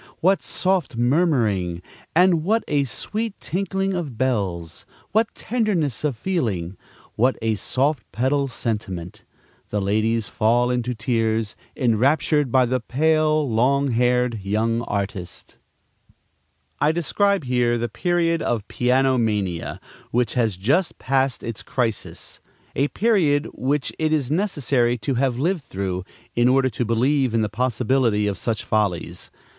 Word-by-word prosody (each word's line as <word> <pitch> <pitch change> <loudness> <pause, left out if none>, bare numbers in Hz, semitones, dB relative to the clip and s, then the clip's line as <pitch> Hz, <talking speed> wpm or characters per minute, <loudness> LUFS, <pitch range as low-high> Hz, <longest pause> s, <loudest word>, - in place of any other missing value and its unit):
what 190 +3 +3
soft 185 -9 0
murmuring, 120 - +1 0.4
and 175 -2 +4
what 220 +6 +2
a 145 -1 +1
sweet 210 - -4
tinkling 195 +1 -2
of 155 -10 -4
bells! 95 -10 -2 0.3
what 220 +2 +3
tenderness 195 - -1
of 145 -6 0
feeling! 110 - -2 0.4
what 125 +4 +2
a 115 -1 0
soft 130 +4 -1
pedal 135 +3 +1
sentiment! 105 -8 -4 0.5
The 105 - -1
ladies 110 +3 +1
fall 120 +2 +2
into 125 0 -1
tears, 110 -1 0 0.2
enraptured 135 +3 +2
by 130 0 +4
the 130 +1 0
pale, 155 +4 +2
long 130 +4 +2
haired 125 -1 +2
young 110 +4 0
artist. 100 -3 -5 1.2
I 150 - +3
describe 195 +4 +1
here 125 -2 +1
the 120 0 -1
period 165 +5 0
of 110 -7 -1
piano 130 +1 +2
mania, 100 -7 -1 0.3
which 120 -1 +1
has 115 -7 +1
just 140 - +1
passed 135 -1 0
its 115 -2 -5
crisis; 115 -5 -3 0.4
a 140 - +2
period 165 -9 +2
which 135 +2 -1
it 155 -1 +1
is 145 -4 0
necessary 140 - +1
to 125 +5 -2
have 125 -1 +1
lived 170 +5 0
through, 95 -5 -4 0.3
in 120 +1 +4
order 130 +1 +3
to 120 - -2
believe 125 +2 +1
in 110 - +2
the 105 - -1
possibility 120 -1 +1
of 100 -1 -2
such 115 -2 -2
follies. 105 -5 -1
125 Hz, 135 wpm, -23 LUFS, 110-150 Hz, 1.2 s, and